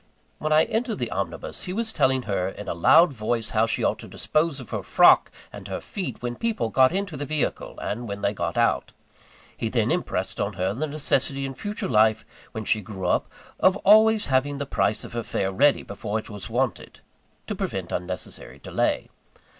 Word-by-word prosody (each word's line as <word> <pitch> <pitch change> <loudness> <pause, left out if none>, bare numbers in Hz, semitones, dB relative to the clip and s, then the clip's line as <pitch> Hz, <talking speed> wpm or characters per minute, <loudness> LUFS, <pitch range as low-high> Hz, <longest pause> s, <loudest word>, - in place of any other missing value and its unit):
When 155 - -2
I 155 +1 +6
entered 225 0 -1
the - - -3
omnibus, - - -4
he 180 - -4
was 225 +2 -2
telling 130 -1 +2
her 95 -4 -1
in 105 +1 -9
a - - -1
loud 155 - +5
voice 115 -1 -2
how 110 +1 +2
she 115 - -1
ought - - +1
to - - -10
dispose 155 -2 0
of 125 - -10
her - - -2
frock - - +5 0.2
and - - -9
her - - -4
feet 185 -9 -6
when 120 0 -3
people 225 - -1
got 130 +3 +4
into 190 -2 -2
the 145 - -4
vehicle, 150 +1 -2
and 120 +3 -4
when 100 -1 -6
they 100 - +1
got 85 -3 -3
out. - - +1 0.6
He 115 - -2
then 115 -1 +1
impressed 95 - -2
on 100 +1 -1
her 95 +1 -1
the 150 +8 -2
necessity 140 -2 0
in 135 - -4
future 205 +10 -4
life, 110 0 +3 0.3
when 110 -2 -5
she 110 - +2
grew 95 -2 -7
up, 90 - +1 0.3
of 185 +1 +4
always 220 +1 +6
having 135 +2 +1
the 140 - -3
price 105 -5 0
of - - -10
her 120 - -2
fare 95 -3 -2
ready 140 +8 +3
before 105 +1 -4
it 110 - -7
was 105 -1 -7
wanted, 125 +2 -2 0.4
to - - -3
prevent - - -4
unnecessary 90 0 -5
delay. - - -1
125 Hz, 200 wpm, -25 LUFS, 105-155 Hz, 0.6 s, I